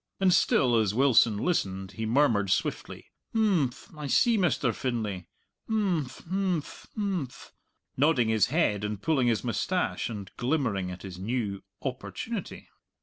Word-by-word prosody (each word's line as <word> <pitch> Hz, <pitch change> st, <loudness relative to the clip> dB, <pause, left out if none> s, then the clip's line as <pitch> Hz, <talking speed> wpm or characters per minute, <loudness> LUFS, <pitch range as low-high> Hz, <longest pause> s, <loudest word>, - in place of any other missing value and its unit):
And 190 Hz, -2 st, +4 dB
still 125 Hz, -7 st, +3 dB
as 105 Hz, -2 st, +1 dB
Wilson 120 Hz, -5 st, +4 dB
listened 95 Hz, -, -1 dB
he 110 Hz, +1 st, -4 dB
murmured 115 Hz, -6 st, +3 dB
swiftly, 95 Hz, -, -2 dB, 0.2 s
"Imphm! 180 Hz, -, 0 dB
I 150 Hz, -, -4 dB
see, 235 Hz, -, +4 dB
Mr. 155 Hz, -, +1 dB
Finlay; 105 Hz, -9 st, -3 dB, 0.4 s
imphm! 190 Hz, -10 st, +1 dB, 0.2 s
imphm! 185 Hz, -4 st, -2 dB
imphm!" 185 Hz, -, -3 dB, 0.5 s
nodding 135 Hz, -5 st, +3 dB
his 110 Hz, -2 st, +3 dB
head 120 Hz, -, +1 dB
and 105 Hz, -1 st, -3 dB
pulling 135 Hz, 0 st, +1 dB
his 115 Hz, -2 st, +1 dB
moustache 130 Hz, -, -1 dB
and 100 Hz, -4 st, -7 dB
glimmering 120 Hz, -9 st, 0 dB
at 90 Hz, 0 st, -8 dB
his 95 Hz, -2 st, -8 dB
new 105 Hz, -1 st, -2 dB, 0.2 s
"opportunity." 155 Hz, -, -5 dB
125 Hz, 135 wpm, -28 LUFS, 105-165 Hz, 0.5 s, And